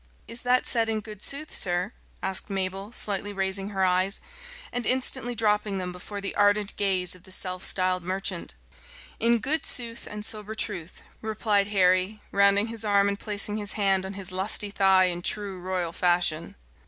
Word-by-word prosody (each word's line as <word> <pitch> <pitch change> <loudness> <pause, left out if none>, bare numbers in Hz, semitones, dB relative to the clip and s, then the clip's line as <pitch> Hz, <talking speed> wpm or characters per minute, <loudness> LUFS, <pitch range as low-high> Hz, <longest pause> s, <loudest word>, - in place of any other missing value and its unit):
"Is 230 +1 -7
that 250 +1 +2
said 230 -2 +2
in 220 -1 -1
good 210 -1 -10
sooth, 295 +2 -3
sir?" 180 +3 +2 0.3
asked 190 +2 0
Mabel, 195 +1 -3
slightly 205 -3 0
raising 195 0 -1
her 190 -2 0
eyes, 185 +2 +1 0.5
and 245 -2 -2
instantly 255 -1 +1
dropping 210 -2 +1
them 180 -1 -3
before 180 +3 -7
the 195 0 -3
ardent 205 0 +2
gaze 185 -3 0
of 180 - -10
the 185 - -15
self 185 0 -2
styled 185 -1 +1
merchant. 185 - -3 0.6
"In 235 +1 +3
good 300 +7 +1
sooth 235 -2 0
and 210 0 -6
sober 215 0 -2
truth," 185 -6 -4 0.2
replied 215 -2 0
Henry, 185 +1 +2
rounding 200 +1 +4
his 225 -1 -4
arm 200 -1 +3
and 200 0 -3
placing 210 0 +2
his 205 -1 -1
hand 195 -2 +2
on 190 +1 -6
his 195 -1 -6
lusty 200 +2 0
thigh 190 -2 +4
in 175 -1 -2
true 200 0 -2
royal 180 -2 -3
fashion. 175 -3 +1
200 Hz, 175 wpm, -26 LUFS, 185-215 Hz, 0.6 s, rounding